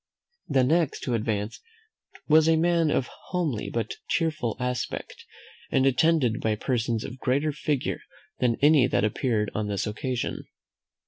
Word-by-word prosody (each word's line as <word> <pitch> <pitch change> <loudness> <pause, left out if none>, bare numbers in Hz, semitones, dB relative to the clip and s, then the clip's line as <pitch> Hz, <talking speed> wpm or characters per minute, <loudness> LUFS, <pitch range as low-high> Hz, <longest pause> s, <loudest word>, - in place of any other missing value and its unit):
The 135 -3 +3
next 160 +3 +1
who 125 - -1
advanced 110 -1 -2 0.7
was 160 +1 +5
a 165 - +5
man 165 0 +2
of 135 - +1
a - - -13 0.2
homely 160 - -2
but 115 -2 -3
cheerful 155 -9 0
aspect, 125 -2 -4 0.4
and 135 0 +2
attended 135 -3 +3
by 110 -1 +1
persons 115 -1 -1
of 130 - -8
greater 140 +5 +1
figure 150 -2 -2 0.4
than 120 -2 +2
any 145 -4 +6
that - - +1
appeared 110 0 0
on 110 -1 -2
this 100 -1 -1
occasion. 120 +4 -3
125 Hz, 145 wpm, -26 LUFS, 115-155 Hz, 0.7 s, any